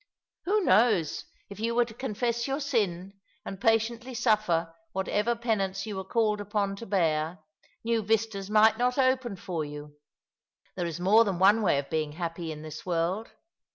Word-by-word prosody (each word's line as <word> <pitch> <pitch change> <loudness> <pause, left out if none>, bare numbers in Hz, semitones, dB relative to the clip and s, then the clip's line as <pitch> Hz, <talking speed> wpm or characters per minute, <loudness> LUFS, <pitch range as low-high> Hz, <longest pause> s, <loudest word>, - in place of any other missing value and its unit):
Who 415 +4 +2
knows 210 - +3 0.2
if 200 - -11
you 230 +1 -1
were 240 0 +4
to 225 - -11
confess 235 0 -2
your 270 +1 -1
sin, 200 - -2 0.3
and 195 - -7
patiently 230 +2 +1
suffer 210 -8 +1 0.2
whatever 210 +4 0
penance 210 -5 -1
you 215 -2 -5
were 190 - -4
called 210 +1 0
upon 205 -1 -1
to 230 - -8
bear, 165 -3 0 0.5
new 230 0 +1
vistas 215 -2 -1
might 215 +1 +5
not 250 +1 +1
open 260 -4 +1
for 175 -3 -4
you? 150 0 -9 0.7
There 175 -2 -2
is 170 0 -5
more 205 +6 +5
than 195 -5 -2
one 200 +5 +5
way 185 -8 +3
of 140 0 -4
being 155 -2 -1
happy 165 0 -4
in 155 0 -8
this 155 -1 -8
world. 180 +5 -1
205 Hz, 170 wpm, -28 LUFS, 175-230 Hz, 0.7 s, might